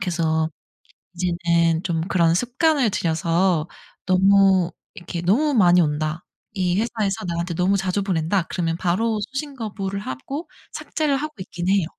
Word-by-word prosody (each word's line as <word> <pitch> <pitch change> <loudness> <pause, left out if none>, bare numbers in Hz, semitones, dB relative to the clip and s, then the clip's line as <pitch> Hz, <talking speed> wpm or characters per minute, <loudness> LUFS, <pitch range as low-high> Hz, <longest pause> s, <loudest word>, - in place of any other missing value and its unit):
그래서 160 -4 0 0.7
이제는 170 -1 +1
좀 170 -4 -1
그런 170 -4 +3
습관을 255 - +2
들여서 170 -1 +1 0.4
너무 190 -1 +4 0.2
이렇게 175 -1 -6
'너무 255 - +2
많이 180 -7 +5
온다. 155 +1 -1 0.3
이 180 -2 0
회사에서 215 -4 -1
나한테 170 +1 -2
너무 180 +4 +2
자주 190 +1 -1
보낸다.' 185 0 0
그러면 165 -2 -1
바로 210 +5 0
수신 275 +1 -5
거부를 200 -4 -4
하고 240 - -6 0.3
삭제를 305 -3 -1
하고 305 +2 -4
있기는 180 0 -3
해요. 195 -5 +2
185 Hz, 315 characters per minute, -22 LUFS, 170-205 Hz, 0.7 s, 많이